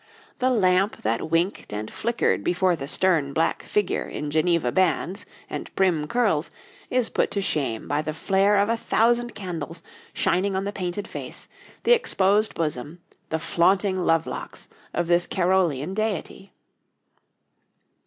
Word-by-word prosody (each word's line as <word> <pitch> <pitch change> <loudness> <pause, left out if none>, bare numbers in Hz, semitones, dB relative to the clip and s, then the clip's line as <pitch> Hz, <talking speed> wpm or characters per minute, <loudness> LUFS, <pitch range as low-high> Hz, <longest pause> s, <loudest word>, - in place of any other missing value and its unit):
The 255 0 +2
lamp 195 -3 +2
that 115 +8 -1
winked 170 +4 0
and 105 +1 -5
flickered 235 +1 0
before 180 0 +2
the 140 -4 -6
stern 155 -4 +1
black 165 +2 +1
figure 205 -3 -1
in 150 -1 -5
Geneva 160 -4 +2
bands 185 +2 0 0.2
and - - -6
prim 175 -6 +2
curls 210 -10 +1 0.4
is 250 -2 +1
put - - +1
to 200 - -1
shame 135 -10 -1
by 145 +2 0
the 155 0 -3
flare 195 +5 +2
of 200 +1 +3
a 230 - +1
thousand 240 +2 +1
candles 170 -3 -5 0.3
shining 190 +2 +1
on 190 - 0
the 200 - -3
painted 185 +1 -4
face, - - -7 0.4
the 485 - +6
exposed 210 - +2
bosom, 155 +1 -3 0.3
the 160 - 0
flaunting 185 +4 +2
love 165 -2 +2
locks - - -7 0.2
of 175 - -1
this 175 +1 +3
Carolean 180 -4 +1
deity. 205 -2 -3
180 Hz, 145 wpm, -24 LUFS, 160-200 Hz, 0.4 s, the